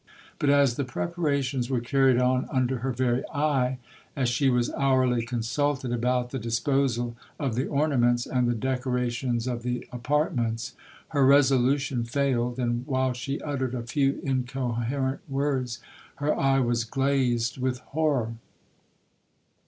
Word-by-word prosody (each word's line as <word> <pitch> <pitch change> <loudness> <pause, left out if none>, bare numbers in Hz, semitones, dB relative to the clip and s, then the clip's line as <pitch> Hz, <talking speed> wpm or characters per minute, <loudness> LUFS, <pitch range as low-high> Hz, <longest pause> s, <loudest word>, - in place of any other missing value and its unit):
But 145 - +1
as 140 -4 +4
the 140 - 0
preparations 140 -3 -1
were 130 -2 +1
carried 130 +1 +3
on 125 +1 +2
under 130 -1 0
her 130 +2 -1
very 125 0 +1
eye,—as 130 -3 -1
she 135 +3 +2
was 125 -1 +1
hourly 130 -3 +2
consulted 125 +3 -1
about 125 +1 0
the 135 - -3
disposal 120 +1 0 0.3
of 135 -6 -1
the 130 +4 -1
ornaments, 125 -5 +2
and 125 -2 0
the 120 - +1
decorations 125 -1 -1
of 120 -2 -2
the 125 0 -3
apartments,—her 125 0 -2
resolution 135 -1 +3
failed, 125 -1 0
and 120 -1 -1
while 130 -2 +1
she 135 +3 -4
uttered 130 -4 -2
a 120 - -3
few 135 +3 0
incoherent 130 0 -1
words, 135 -3 -1 0.4
her 145 +2 0
eye 135 0 +2
was 120 -2 +1
glazed 130 -2 0
with 130 0 0 0.2
horror. 140 -7 +1
130 Hz, 130 wpm, -26 LUFS, 120-135 Hz, 0.4 s, as